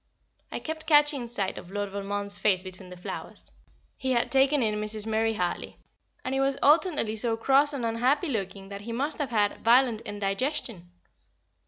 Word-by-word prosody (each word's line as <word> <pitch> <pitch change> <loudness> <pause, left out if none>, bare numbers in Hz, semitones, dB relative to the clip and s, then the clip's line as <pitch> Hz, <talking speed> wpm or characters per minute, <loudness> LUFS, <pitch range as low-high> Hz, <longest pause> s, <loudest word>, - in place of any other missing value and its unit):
I - - -3
kept 315 0 -6
catching 295 -5 +4
sight 205 -5 -2
of 175 - -13
Lord 205 0 -3
Valmond's 200 0 -3
face 190 -3 +2
between 185 0 -10
the 180 - -10
flowers 180 - -7 0.5
he 260 -1 -1
had 235 - +1
taken 270 0 +4
in 210 -1 0
Mrs. 215 0 -2
Murray 225 0 +1
Hartley 180 -3 -3 0.5
and 260 - -2
it 270 - +1
was 270 0 +1
alternately 295 - +3
so 225 +1 0
cross 275 +5 +4
and 270 -5 -3
unhappy 255 +9 +1
looking, 195 -4 -4
that 200 0 -7
he 230 +3 -7
must 280 +7 -2
have 290 -3 -1
had 210 -3 0
violent 235 -1 +4
indigestion. 205 - -3
230 Hz, 175 wpm, -27 LUFS, 205-270 Hz, 0.5 s, catching